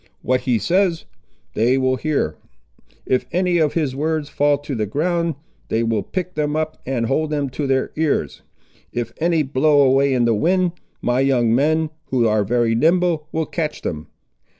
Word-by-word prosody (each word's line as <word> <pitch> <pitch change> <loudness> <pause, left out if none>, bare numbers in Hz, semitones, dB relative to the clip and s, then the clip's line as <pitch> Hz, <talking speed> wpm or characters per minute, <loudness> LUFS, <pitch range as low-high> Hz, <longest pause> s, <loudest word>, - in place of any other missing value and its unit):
What 130 0 +1
he 125 -2 +1
says, 170 - +1 0.5
they 120 +5 +2
will 130 0 +2
hear. 140 - -1 0.7
If 130 - 0
any 180 0 +1
of 155 -2 +2
his 150 -6 -1
words 155 +1 -1
fall 145 0 +2
to 145 0 -7
the 110 -4 -1
ground, 170 - 0 0.3
they 115 +1 +1
will 115 -2 0
pick 180 - -4
them 150 0 -1
up 155 0 -3
and 125 -3 -1
hold 155 +6 0
them 145 -3 -2
to 140 +2 -3
their 130 0 0
ears. 155 -1 -1 0.5
If 120 -1 -4
any 165 -1 +2
blow 145 +2 +2
away 135 0 +3
in 120 -1 +2
the 115 - +3
wind, 180 - +2 0.3
my 125 +1 +1
young 125 -4 +2
men, 155 +4 +2
who 120 -3 +1
are 105 -1 +2
very 115 +2 +1
nimble, 165 +4 +2
will 160 0 -1
catch 155 -2 -4
them. 75 -1 -4
145 Hz, 175 wpm, -20 LUFS, 125-160 Hz, 0.7 s, away